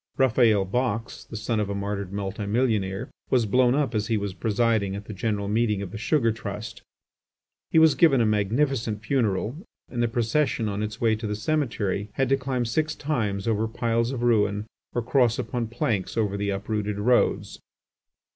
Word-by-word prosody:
Raphael 115 -6 +4
Box, 115 +2 -2
the 110 - -7
son 110 +1 -1
of 105 -1 -1
a 100 - -2
martyred 100 -1 -3
multi 100 +1 -4
millionaire, 110 -1 0 0.2
was 125 -3 +3
blown 125 +4 +3
up 145 -3 0
as 110 -1 -1
he 115 -2 +1
was 100 -2 -3
presiding 110 -1 +1
at 100 +1 -7
the 110 - -7
general 100 0 -2
meeting 105 -1 +1
of 90 - -7
the - - -6
Sugar 115 0 +2
Trust. 105 -1 -6 0.9
He - - +1
was 160 -2 +7
given 155 -6 +4
a 115 - +3
magnificent 110 +1 0
funeral 115 - 0 0.3
and 120 - -2
the 120 - +3
procession 115 +1 0
on 100 0 -2
its 110 +1 -4
way 115 -2 +3
to 110 0 -4
the 105 - -2
cemetery 105 -6 -1
had 135 -1 0
to 135 - +5
climb 130 -2 -2
six 155 +7 0
times 110 -10 -2
over 110 0 +1
piles 115 +1 0
of 125 -3 -3
ruins 105 -3 +2 0.3
or 120 - 0
cross 120 -2 +2
upon 120 -2 -2
planks 110 -3 -2
over 105 -3 +1
the 100 0 -2
uprooted 105 +1 -2
roads. 120 +4 +1
110 Hz, 185 wpm, -25 LUFS, 105-120 Hz, 0.9 s, was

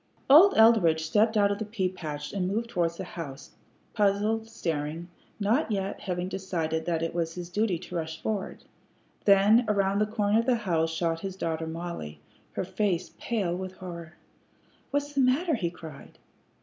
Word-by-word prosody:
Old 350 +8 +8
Eldridge 205 -9 +5
stepped 215 +7 +2
out 200 -1 +4
of 200 - -2
the - - -1
pea 205 -3 -1
patch 150 -5 -6
and 190 -2 -1
moved 230 +4 -2
towards 170 -4 0
the 190 - -4
house, 165 -7 -8 0.4
puzzled, 215 +2 +1
staring, 165 -4 -3 0.3
not 225 +6 +1
yet 195 -1 -2
having 180 -1 -3
decided 165 -4 -2
that 165 -2 -1
it 165 - -2
was 165 -1 -2
his 175 -1 -6
duty 210 -2 +1
to 180 +1 -9
rush 160 -1 -4
forward. 210 0 -4 0.6
Then 205 +4 +6
around 200 -1 +1
the 210 - +2
corner 210 0 +1
of 230 - -1
the 255 - +4
house 165 -3 +1
shot 165 0 -1
his 190 +1 -5
daughter 160 -3 -3
Mollie, 160 - -6 0.3
her - - -2
face 185 -1 -1
pale 200 -7 -1
with 185 0 -5
horror. 170 -2 -9 0.7
"What's 285 0 -2
the 280 - +2
matter?" 285 +7 +2
he 185 - 0
cried. 160 -5 -12
185 Hz, 175 wpm, -28 LUFS, 165-215 Hz, 0.7 s, Old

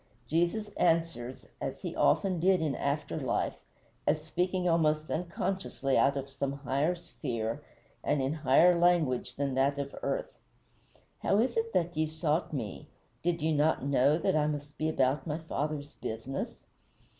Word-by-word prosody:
Jesus 175 +7 0
answers, 165 -7 0 0.2
as - - -4
he - - -3
so - - -7
often 185 -3 +3
did 185 +2 +4
in 155 -3 0
after 145 +4 -2
life, 130 -4 -1 0.5
as 155 - +3
speaking 180 +3 0
almost 155 -2 +2
unconsciously 170 -4 -1
out 140 +1 +4
of 135 0 -3
some 140 0 -3
higher 140 +4 0
sphere, 120 -10 -4 0.4
and 145 - +1
in 135 +2 0
higher 160 +4 +5
language 170 -8 +2
than 140 -1 -1
that 135 +2 +2
of 140 -1 -4
earth: - - -3 0.8
"How 200 - +2
is 235 +2 +2
it 225 0 0
that 175 -2 +1
ye 155 0 +1
sought 155 0 -1
me? 105 - -5 0.3
Did 170 -1 0
ye 160 0 +2
not 150 -2 +2
know 140 +2 +4
that 165 - +1
I 150 -1 +3
must 145 -1 -4
be 155 - 0
about 135 0 +1
my 150 0 -1
Father's 150 -2 -3
business?" 115 +5 -4
155 Hz, 160 wpm, -30 LUFS, 140-170 Hz, 0.8 s, higher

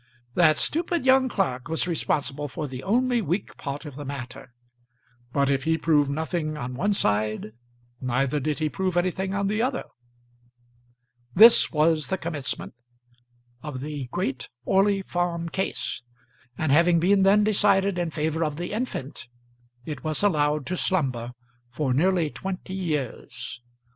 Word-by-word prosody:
That 155 -1 +5
stupid 335 -2 0
young 260 0 +5
clerk 130 - -1
was 165 +2 +1
responsible 145 -3 -1
for 150 +2 -5
the 130 -1 -7
only 245 - +1
weak 185 +1 -2
part 140 +2 -5
of 145 -3 -8
the 145 - -6
matter; 130 -2 -7 0.8
but 140 +1 +2
if 135 0 0
he 160 0 +2
proved 150 -4 +2
nothing 155 +1 -2
on 125 -2 -5
one 200 +11 0
side, 105 - 0 0.5
neither 130 +3 0
did 150 +2 -1
he 155 - 0
prove 185 +2 -2
anything 190 +2 0
on 200 0 0
the 210 +3 0
other. 255 +1 -1 1.5
This 230 +4 +8
was 155 -1 +2
the 190 - -1
commencement 155 -6 -3 0.9
of 150 -4 -6
the 145 -1 -5
great 135 -2 -3 0.2
Orley 195 0 +3
Farm 175 -2 -2
Case, 190 +3 -3 0.6
and 155 -3 0
having 170 +3 +5
been 195 +4 +3
then 200 +2 +5
decided 200 -3 +3
in 175 -1 -1
favour 160 +1 -1
of 150 -2 -2
the 175 +5 -5
infant 210 - -4 0.6
it 150 -4 -6
was 155 +4 0
allowed 150 -6 +2
to 185 - -2
slumber 130 -11 -1 0.4
for 130 +1 -1
nearly 170 +1 +2
twenty 190 0 -6
years. 150 -9 -4
160 Hz, 150 wpm, -25 LUFS, 140-190 Hz, 1.5 s, This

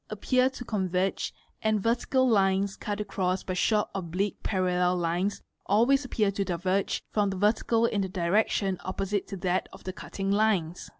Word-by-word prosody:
appear 255 0 +2
to 255 -2 -9
con 195 -5 -1
verge, 185 +2 0 0.3
and 215 -1 +2
vertical 240 +4 +1
lines 195 -3 +2
cut 205 0 -4
across 190 -3 -1
by 185 - -3
short 210 +3 +2
oblique 190 +2 -2
parallel 180 -2 +1
lines 175 +4 -1 0.2
always 240 +7 +4
appear 215 -5 0
to 200 0 -1
diverge 185 +1 -1
from 205 -2 +1
the 190 - -3
vertical 225 +3 +2
in 210 -3 0
the 190 - -2
direction 190 +1 +1
opposite 195 +1 -2
to 195 - -6
that 180 0 -1
of - - -13
the 185 - -5
cutting 195 0 -4
lines. 200 -5 +1
195 Hz, 170 wpm, -28 LUFS, 185-215 Hz, 0.3 s, always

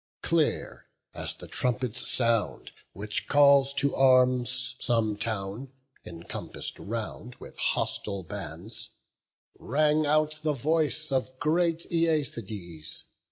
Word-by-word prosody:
Clear - - 0 0.3
as - - -4
the - - -9
trumpet's 125 -2 -1
sound, 115 -5 0 0.2
which 105 +2 -4
calls 140 -1 +6
to 140 0 +1
arms 130 -1 +3
Some 115 -3 +1
town, 110 +4 -4 0.3
encompass'd 85 0 -6
round 115 +2 -5
with - - -12
hostile 100 -2 -1
bands, 85 - -6 0.7
Rang 150 +3 +2
out 155 +1 +2
the 155 -1 +1
voice 155 +2 0
of 130 -1 -1
great 165 +3 +1
Æacides. 115 - -1
130 Hz, 105 wpm, -28 LUFS, 110-150 Hz, 0.7 s, calls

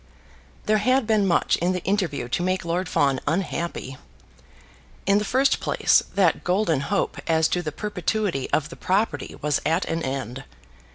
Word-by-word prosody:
There 215 0 +3
had 255 +3 +2
been 215 -3 +2
much 170 - +2
in 180 +2 0
the 180 - -4
interview 180 - -1
to 125 - -1
make 185 0 -1
Lord 175 +1 -1
Fawn 140 -2 +2
unhappy. 165 -5 -2 1.1
In 200 +1 +4
the - - -2
first 265 +6 +2
place, - - +3
that 185 -5 +2
golden 180 -5 +1
hope 140 - -1
as 160 -1 +3
to 180 - 0
the 155 -3 -4
perpetuity 205 -4 -2
of 150 -1 0
the 170 - -9
property 185 -7 -1
was 150 -1 +1
at 165 +4 +1
an 165 0 -2
end. 130 -2 -4
175 Hz, 165 wpm, -24 LUFS, 150-200 Hz, 1.1 s, In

